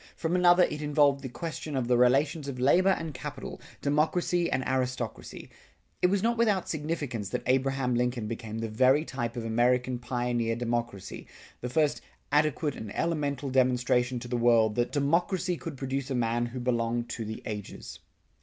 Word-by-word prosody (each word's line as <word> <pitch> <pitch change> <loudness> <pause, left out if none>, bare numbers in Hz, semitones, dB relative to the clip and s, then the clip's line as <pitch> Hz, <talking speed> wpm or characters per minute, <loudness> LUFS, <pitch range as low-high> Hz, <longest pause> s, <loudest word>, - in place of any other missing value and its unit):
From 165 +1 -1
another 180 0 +6
it 150 -3 -1
involved 145 -2 +3
the 130 - -5
question 160 +1 -5
of 130 -3 -1
the 125 - +3
relations 140 +5 +3
of 130 -3 -5
labor 175 +9 +4
and 165 -5 -1
capital, 140 +1 -7 0.2
democracy 170 +4 +1
and 130 0 0
aristocracy. 125 -3 -3 0.5
It - - +5
was 195 +1 +1
not 235 0 +1
without 210 -6 +2
significance 145 - -3
that - - -3
Abraham 130 0 +1
Lincoln 120 -1 0
became 110 0 -5
the 115 0 -2
very 130 +7 +3
type 120 -5 -4
of 120 -2 -4
American 125 +2 +1
pioneer 120 -2 -1
democracy, 115 -5 -4 0.3
the 125 - -4
first 150 +2 +1 0.3
adequate 150 -1 +1
and 110 -2 -7
elemental 145 -5 -1
demonstration 125 -1 +2
to 120 0 -6
the 120 0 -1
world 115 -2 +4
that 120 +2 +1
that - - -17
democracy 170 +5 +1
could 165 -4 -7
produce 135 0 -3
a 135 - -1
man 120 0 0
who 125 +2 -6
belonged 120 -1 0
to 115 - -4
the 110 0 -6
ages. 105 -2 -7
130 Hz, 175 wpm, -28 LUFS, 120-150 Hz, 0.5 s, another